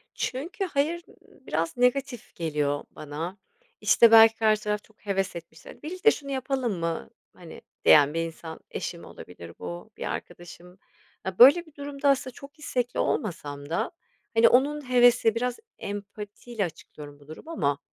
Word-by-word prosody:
Çünkü, 330 Hz, +10 st, -3 dB
"hayır" 330 Hz, +1 st, -1 dB, 0.2 s
biraz 165 Hz, -, -4 dB
negatif 250 Hz, -1 st, 0 dB
geliyor 150 Hz, -3 st, -1 dB
bana. 160 Hz, +6 st, -6 dB, 0.4 s
İşte, 235 Hz, -1 st, +6 dB
belki 225 Hz, 0 st, +8 dB
karşı 215 Hz, -1 st, +2 dB
taraf 210 Hz, -1 st, -2 dB
çok 215 Hz, -1 st, -26 dB
heves 195 Hz, -2 st, -1 dB
etmiştir. 165 Hz, -2 st, -11 dB
"Birlikte 370 Hz, +7 st, +2 dB
şunu 280 Hz, -7 st, -6 dB
yapalım 260 Hz, -6 st, -2 dB
mı?", 165 Hz, -, -3 dB, 0.2 s
hani, -, -, -12 dB, 0.2 s
diyen 145 Hz, 0 st, +7 dB
bir 165 Hz, -, -1 dB
insan; 160 Hz, 0 st, -9 dB
eşim -, -, -5 dB
olabilir 85 Hz, -1 st, -11 dB
bu, 85 Hz, -1 st, -7 dB
bir -, -, -6 dB
arkadaşım... 175 Hz, +1 st, -10 dB, 0.5 s
Ya, 190 Hz, -1 st, -5 dB
böyle 285 Hz, +8 st, +8 dB
bir 315 Hz, -, -20 dB
durumda 285 Hz, 0 st, -2 dB
aslında 260 Hz, -2 st, +1 dB
çok 285 Hz, +4 st, -14 dB
istekli 250 Hz, -4 st, -2 dB
olmasam 145 Hz, -7 st, -3 dB
da, 210 Hz, +8 st, -1 dB, 0.4 s
hani, 225 Hz, 0 st, +6 dB
onun 280 Hz, +2 st, +2 dB
hevesi, 245 Hz, -2 st, +5 dB
biraz 245 Hz, +1 st, -2 dB, 0.2 s
empatiyle 205 Hz, +2 st, -5 dB
açıklıyorum 150 Hz, -3 st, -11 dB
bu 145 Hz, -, -20 dB
durumu 160 Hz, -, -10 dB
ama, 140 Hz, -, 0 dB
220 Hz, 145 wpm, -26 LUFS, 165-265 Hz, 0.5 s, belki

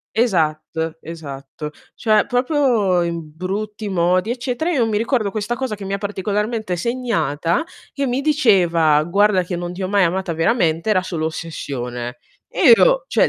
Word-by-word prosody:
Esatto, 160 Hz, -7 st, 0 dB
esatto. 150 Hz, -2 st, -8 dB, 0.2 s
Cioè 215 Hz, -2 st, +2 dB
proprio 245 Hz, -, +2 dB
in 170 Hz, -2 st, -4 dB
brutti 210 Hz, +4 st, -4 dB
modi, 180 Hz, +2 st, +1 dB
eccetera. 250 Hz, +5 st, -2 dB
Io 260 Hz, -7 st, +2 dB
mi 215 Hz, -2 st, 0 dB
ricordo 225 Hz, -2 st, 0 dB
questa 215 Hz, +3 st, -2 dB
cosa 255 Hz, -4 st, -3 dB
che 200 Hz, -, -8 dB
mi 195 Hz, -, -4 dB
ha 200 Hz, -, 0 dB
particolarmente 210 Hz, +1 st, -2 dB
segnata, 170 Hz, -, -1 dB, 0.3 s
che 280 Hz, -1 st, -2 dB
mi 250 Hz, +2 st, 0 dB
diceva: 180 Hz, -, +3 dB
"Guarda 195 Hz, +2 st, +3 dB
che 180 Hz, -, -4 dB
non 175 Hz, 0 st, -4 dB
ti 185 Hz, +2 st, -6 dB
ho 185 Hz, -, -1 dB
mai 200 Hz, 0 st, +3 dB
amata 185 Hz, 0 st, 0 dB
veramente, 165 Hz, +1 st, +1 dB
era 185 Hz, -3 st, +3 dB
solo 165 Hz, -4 st, -3 dB
ossessione". 125 Hz, -7 st, -5 dB, 0.3 s
E -, -, +5 dB
io -, -, +4 dB
cioè -, -, +3 dB
190 Hz, 160 wpm, -20 LUFS, 165-230 Hz, 0.3 s, E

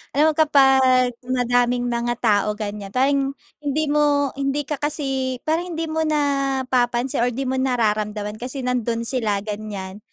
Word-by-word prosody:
Alam 310 Hz, +2 st, +4 dB
mo -, -, -6 dB
kapag 265 Hz, -4 st, +4 dB
madaming 245 Hz, -1 st, +1 dB
mga 240 Hz, 0 st, -1 dB
tao, 210 Hz, -1 st, +2 dB
ganyan. 210 Hz, -1 st, -5 dB
Parang 275 Hz, +1 st, +1 dB, 0.2 s
hindi 295 Hz, +1 st, -1 dB
mo 290 Hz, -2 st, +2 dB
hindi 275 Hz, +1 st, 0 dB
ka 290 Hz, 0 st, -4 dB
kasi 270 Hz, -3 st, -2 dB
parang 335 Hz, +2 st, -1 dB
hindi 325 Hz, -, -2 dB
mo 320 Hz, -, -1 dB
napapansin 270 Hz, -4 st, 0 dB
or 240 Hz, -, +3 dB
di 250 Hz, +3 st, -2 dB
mo 260 Hz, 0 st, -1 dB
nararamdaman 215 Hz, -4 st, -1 dB
kasi 255 Hz, +2 st, -5 dB
nandun 235 Hz, -2 st, -1 dB
sila, 220 Hz, -5 st, -1 dB
ganyan. 205 Hz, -2 st, -6 dB
255 Hz, 150 wpm, -22 LUFS, 230-280 Hz, 0.2 s, Alam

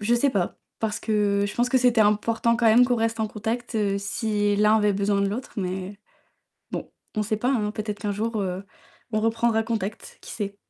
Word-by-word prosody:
Je 230 Hz, +3 st, +2 dB
sais 275 Hz, +4 st, +3 dB
pas 195 Hz, -7 st, -1 dB, 0.2 s
parce 220 Hz, -2 st, -2 dB
que 205 Hz, -2 st, +1 dB
je 205 Hz, -, -6 dB
pense 245 Hz, +1 st, +1 dB
que 260 Hz, -, +4 dB
c'était 245 Hz, -3 st, +4 dB
important 225 Hz, +2 st, +2 dB
quand 235 Hz, 0 st, +1 dB
même 230 Hz, +3 st, +7 dB
qu'on 245 Hz, -1 st, +1 dB
reste 225 Hz, 0 st, 0 dB
en 220 Hz, -, +1 dB
contact, 225 Hz, +3 st, -4 dB
heu, 205 Hz, -2 st, +1 dB
si 205 Hz, 0 st, 0 dB
l'un 210 Hz, +1 st, +5 dB
avait 210 Hz, -1 st, +3 dB
besoin 200 Hz, 0 st, +1 dB
de -, -, +2 dB
l'autre, 240 Hz, +6 st, -5 dB
mais 190 Hz, +1 st, -4 dB, 0.7 s
bon, -, -, -5 dB, 0.2 s
on 215 Hz, -, +1 dB
sait 215 Hz, +1 st, -1 dB
pas, 245 Hz, +4 st, 0 dB
hein, 215 Hz, -6 st, +1 dB
peut-être 210 Hz, -1 st, -4 dB
qu'un 205 Hz, -, -2 dB
jour, 220 Hz, +2 st, -2 dB
heu, 185 Hz, 0 st, -3 dB, 0.5 s
on 215 Hz, -, +1 dB
reprendra 225 Hz, 0 st, +1 dB
contact, 220 Hz, -2 st, -4 dB
qui -, -, -10 dB
sait? 200 Hz, -2 st, -4 dB
215 Hz, 215 wpm, -25 LUFS, 205-230 Hz, 0.7 s, même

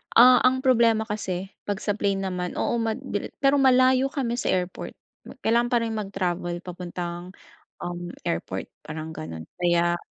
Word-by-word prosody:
ah, 250 Hz, +1 st, +9 dB
ang 260 Hz, +1 st, +1 dB
problema 230 Hz, -4 st, +4 dB
kasi 195 Hz, -3 st, -4 dB, 0.2 s
'pag 200 Hz, -1 st, -2 dB
sa 205 Hz, -, +1 dB
plane 200 Hz, -1 st, 0 dB
naman, 180 Hz, -1 st, -3 dB
oo, 235 Hz, -, 0 dB
mad 225 Hz, -1 st, -1 dB, 0.4 s
pero 275 Hz, +1 st, +5 dB
malayo 260 Hz, 0 st, +5 dB
kami 255 Hz, -3 st, -2 dB
sa -, -, -2 dB
airport. 180 Hz, 0 st, -2 dB, 0.5 s
Kailangan 235 Hz, +2 st, +3 dB
pa 240 Hz, -, +4 dB
rin 225 Hz, -, -2 dB
mag-travel 180 Hz, -4 st, -2 dB
papuntang, 175 Hz, 0 st, -6 dB, 0.5 s
um, 175 Hz, 0 st, -4 dB, 0.2 s
airport 95 Hz, +3 st, -3 dB, 0.2 s
parang 155 Hz, +1 st, -5 dB
gano'n 80 Hz, -, -7 dB, 0.2 s
kaya 175 Hz, 0 st, +2 dB
195 Hz, 150 wpm, -25 LUFS, 175-235 Hz, 0.5 s, ah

